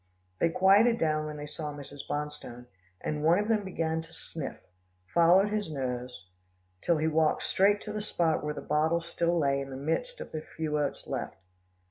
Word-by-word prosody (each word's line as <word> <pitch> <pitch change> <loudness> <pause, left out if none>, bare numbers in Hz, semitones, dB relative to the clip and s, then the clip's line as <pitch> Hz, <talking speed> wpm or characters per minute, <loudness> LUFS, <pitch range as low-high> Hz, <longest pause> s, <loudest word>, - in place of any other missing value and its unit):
They 170 - +3
quieted 200 +7 +5
down 155 -3 +1
when 150 0 -6
they 145 - -5
saw 150 0 -5
Mrs. 145 -1 -9
Bonstone, 145 -5 -4 0.4
and 150 -1 -2
one 165 +3 +5
of 210 +1 0
them 215 -2 +2
beginning 165 -4 -1
to 160 - -15
sniff, 155 -5 -6 0.5
followed 175 - +5
his 210 -4 -1
nose, 125 - -4 0.5
till 170 - +2
he 155 +1 +1
walked 160 0 +2
straight 205 +2 +3
to 210 - -6
the 215 - -2
spot 170 -7 0
where 150 0 -2
the - - -5
bottle 160 +3 +1
still 170 +1 0
lay 140 -3 +2
in 135 - -6
the 130 - -6
midst 325 - -2
of - - -7
the 155 - -4
few 155 -1 -3
oats 145 -1 -2
left. - - -3
160 Hz, 190 wpm, -29 LUFS, 150-175 Hz, 0.5 s, quieted